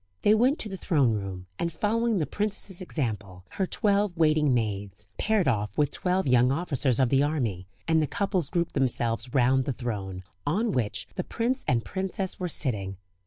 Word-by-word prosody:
They 210 - +6
went 250 +7 +3
to - - -2
the 195 -2 -6
throne 145 -10 +2
room, 95 -3 -4
and 170 - -1
following 225 +5 +1
the 160 - +1
princess's 205 -2 -2
example, 110 - -4
her 190 - -2
twelve 200 -3 +1
waiting 155 -3 +3
maids 105 -4 -2
paired 215 -6 +2
off 105 -4 0
with 145 -2 +2
twelve 185 0 0
young 125 -1 +4
officers 140 -5 0
of 130 -2 +3
the 135 +1 +4
army, 120 - -1 0.2
and 160 -1 +4
the 150 - +1
couples 185 -3 0
grouped 170 -1 -1
themselves 120 -3 0
round 130 0 +3
the 135 - -1
throne, 100 -7 -4 0.2
on 210 - 0
which 120 - -1
the 180 - 0
prince 250 +7 -1
and 115 -4 +1
princess 190 - -3
were 180 -1 -2
sitting. 100 - -1
145 Hz, 180 wpm, -27 LUFS, 115-190 Hz, 0.2 s, They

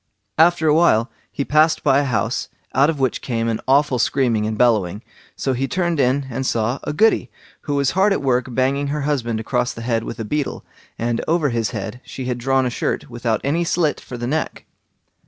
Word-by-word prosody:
After 165 -1 +4
a 150 - +5
while 140 -8 +3 0.2
he 140 - -3
passed 155 +2 +3
by 140 -2 +4
a 145 - 0
house, 115 -2 -1 0.2
out 140 +4 +4
of 155 -3 -2
which 130 -2 0
came 115 -2 -2
an 115 -1 -1
awful 140 -1 +3
screaming 115 -3 +1
and 110 0 -3
bellowing; 105 -4 +2 0.3
so 135 - -1
he 135 +2 -1
turned 170 0 -1
in 135 +1 +2
and 130 +3 -2
saw 120 +1 0
a - - -2
Goody, 220 +9 +2 0.4
who 145 - -1
was 140 -1 +2
hard 195 +3 +3
at 195 - 0
work 125 -2 +1
banging 135 +3 0
her 150 +1 -2
husband 125 -6 -1
across 120 +2 -1
the 115 - -8
head 115 -2 0
with 115 - -7
a 110 - -3
beetle, 145 +6 -3 0.3
and 115 0 -1
over 160 -3 +2
his 115 -3 -1
head 110 +2 -6
she 130 - -7
had 125 -1 -2
drawn 135 +1 +1
a 125 - -1
shirt 120 - -3
without 120 -2 -1
any 160 +5 +1
slit 165 -3 0
for 125 - -8
the 120 - -4
neck. 155 +5 -2
130 Hz, 210 wpm, -20 LUFS, 115-145 Hz, 0.4 s, a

